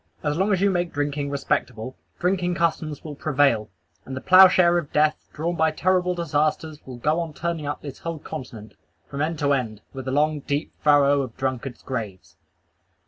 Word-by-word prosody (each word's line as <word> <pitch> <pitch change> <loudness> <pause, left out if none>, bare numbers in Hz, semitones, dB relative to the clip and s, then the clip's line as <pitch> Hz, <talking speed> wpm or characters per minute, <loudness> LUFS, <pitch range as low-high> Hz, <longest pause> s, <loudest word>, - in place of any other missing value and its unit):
As 150 -1 0
long 190 +5 +1
as 190 -2 +2
you 200 0 +4
make 175 -2 -1
drinking 145 0 -2
respectable, 130 -3 -2 0.2
drinking 180 -1 0
customs 155 -3 -1
will 155 - -6
prevail; 135 -7 +1 0.3
and 130 - -7
the - - -2
ploughshare 185 0 +6
of 155 -4 -8
death, 150 0 +1
drawn 170 +3 -2
by 160 -1 +3
terrible 180 +2 +1
disasters, 155 -1 -1
will 125 -2 -7
go 150 +7 +1
on 165 -2 -4
turning 165 -3 -3
up 145 - -4
this 140 -3 -8
whole 165 -1 -4
continent, 115 -7 -8 0.3
from 140 - -5
end 160 +2 -1
to 145 -1 +2
end, 115 -6 -2
with 130 -1 -7
the 130 - -2
long, 150 +2 +2
deep, 145 +2 -3
awful - - -38
furrow 145 -1 +5
of 125 -4 -7
drunkards' 130 -1 -3
graves. 110 -8 -6
150 Hz, 190 wpm, -24 LUFS, 135-170 Hz, 0.3 s, ploughshare